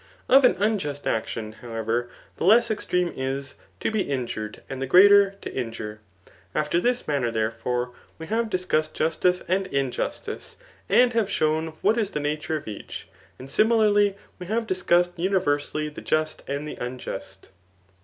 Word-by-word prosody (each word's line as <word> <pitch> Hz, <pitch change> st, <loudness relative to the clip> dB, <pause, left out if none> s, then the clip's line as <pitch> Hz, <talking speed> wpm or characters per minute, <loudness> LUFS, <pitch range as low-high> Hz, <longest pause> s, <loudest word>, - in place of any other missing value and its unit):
Of 270 Hz, +1 st, +7 dB
an 250 Hz, -, +5 dB
unjust 185 Hz, -9 st, -1 dB
action, 110 Hz, -1 st, -2 dB
how 120 Hz, -2 st, -8 dB
ever, 115 Hz, +2 st, -1 dB, 0.3 s
the -, -, -4 dB
less 230 Hz, +5 st, +5 dB
extreme 180 Hz, -4 st, 0 dB
is, 135 Hz, +1 st, -3 dB, 0.3 s
to -, -, 0 dB
be 215 Hz, -2 st, +1 dB
injured, 120 Hz, -, -4 dB
and 135 Hz, -1 st, -6 dB
the 135 Hz, -, -1 dB
greater, 200 Hz, +5 st, +7 dB
to -, -, -6 dB
injure. 110 Hz, -4 st, -5 dB, 0.6 s
After 155 Hz, +3 st, +1 dB
this 245 Hz, +5 st, 0 dB
manner, 135 Hz, -5 st, 0 dB
theref<^e, 115 Hz, +2 st, -2 dB, 0.2 s
we 160 Hz, -, -7 dB
have 225 Hz, +5 st, -1 dB
dis 185 Hz, -2 st, -2 dB
cussed 155 Hz, -3 st, 0 dB
justice 180 Hz, +3 st, +1 dB
and 190 Hz, +2 st, +1 dB
iiqustice, 135 Hz, -2 st, -3 dB, 0.3 s
and 245 Hz, 0 st, +5 dB
have 225 Hz, -3 st, +1 dB
shown 155 Hz, -2 st, 0 dB
what 225 Hz, -, +3 dB
is 210 Hz, -3 st, 0 dB
the 150 Hz, -, -3 dB
nature 150 Hz, +2 st, -2 dB
of 145 Hz, -, -10 dB
each; 105 Hz, -, -7 dB, 0.3 s
and 130 Hz, -, -10 dB
similarly 210 Hz, +2 st, +3 dB, 0.2 s
we 180 Hz, -, -7 dB
have 225 Hz, +3 st, 0 dB
discussed 175 Hz, -3 st, +2 dB
univer 175 Hz, -5 st, +1 dB
sally 150 Hz, +1 st, -3 dB
the 150 Hz, -, -8 dB
just 155 Hz, 0 st, -1 dB
and 140 Hz, +2 st, -3 dB
the -, -, -7 dB
unjust. 100 Hz, -7 st, -7 dB
155 Hz, 165 wpm, -25 LUFS, 130-195 Hz, 0.6 s, Of